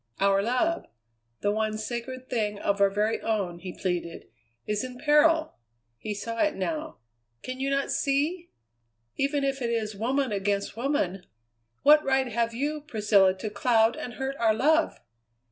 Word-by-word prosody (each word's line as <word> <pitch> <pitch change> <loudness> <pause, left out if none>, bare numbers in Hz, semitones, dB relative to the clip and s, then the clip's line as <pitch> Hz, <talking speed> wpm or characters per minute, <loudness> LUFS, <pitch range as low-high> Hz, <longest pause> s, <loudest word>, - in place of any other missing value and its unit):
"Our 195 0 +3
love, 255 +10 0 0.5
the 205 - +1
one 215 0 -1
sacred 240 +3 -5
thing 210 -4 -1
of 200 0 -1
our 200 - +6
very 210 +3 0
own," 195 -6 -1
he 180 +1 -6
pleaded, 175 -2 -4 0.4
"is 210 +1 -1
in 250 -1 -7
peril." 310 - +3 0.4
He 210 -1 -4
saw 230 +3 -5
it 310 - +2
now. 315 -1 -3 0.5
"Can 255 0 -5
you 270 +1 -1
not 275 0 0
see? 305 +6 0 0.7
Even 280 +1 0
if 275 -1 -1
it 235 - -1
is 220 -2 -1
woman 255 +4 0
against 200 0 -1
woman, 225 - -1 0.6
what 300 +1 +7
right 265 -1 +1
have 230 0 0
you, 290 +6 -2
Priscilla, 210 -8 +3
to 210 +2 -5
cloud 225 +1 +3
and 245 - -6
hurt 270 +1 -3
our 225 -2 +3
love?" 310 +7 +2
235 Hz, 160 wpm, -27 LUFS, 210-275 Hz, 0.7 s, what